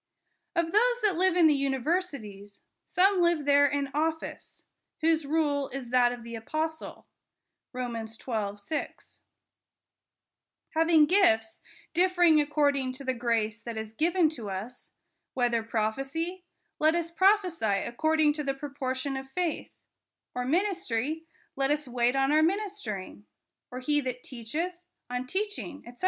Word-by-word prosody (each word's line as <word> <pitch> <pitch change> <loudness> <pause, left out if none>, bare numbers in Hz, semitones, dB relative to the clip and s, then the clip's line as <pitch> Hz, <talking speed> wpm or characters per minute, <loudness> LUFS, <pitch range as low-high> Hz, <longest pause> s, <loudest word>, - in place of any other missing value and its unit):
Of 335 -1 +1
those 485 +5 +3
that 410 -4 +3
live 370 +1 +3
in 350 -2 +5
the 310 - +6
universities, 270 - -2 0.2
some 380 0 +3
live 340 -4 +2
there 285 0 +5
in 280 -1 -1
office; 320 +2 -3 0.4
whose 320 -2 +2
rule 290 -2 +1
is 255 -3 -6
that 245 -1 +4
of 245 -1 -7
the 235 0 -8
apostle 310 +8 -4 0.7
(Rom. 240 -3 -4
xii. 220 -2 -4
6); 205 +10 -6 1.5
Having 325 -1 +5
gifts, 260 - +3 0.3
differing 350 -3 +4
according 285 -3 +1
to 270 +2 -9
the 260 -1 0
grace 230 -2 -1
that 235 -2 -6
is 220 0 -5
given 335 +5 +3
to 235 -10 -7
us, 205 +6 -6 0.5
whether 240 -2 +2
prophecy, 270 +12 -2 0.3
let 310 +2 +4
us 335 -1 -2
prophesy 335 - +2
according 310 +4 +2
to 300 0 -4
the 275 -1 -1
proportion 270 -1 -3
of 265 0 -6
faith; 345 +2 -2 0.6
or 250 0 -2
ministry, 320 - -1 0.3
let 270 0 0
us 295 -1 0
wait 245 +1 +1
on 270 +1 +2
our 305 +1 +5
ministering; 320 - -2 0.4
or 250 - -6
he 295 +3 +1
that 250 -2 -5
teacheth, 280 +9 -4 0.4
on 250 +1 -3
teaching, 380 -4 -4
4*c. 240 +1 -13
285 Hz, 140 wpm, -28 LUFS, 245-330 Hz, 1.5 s, the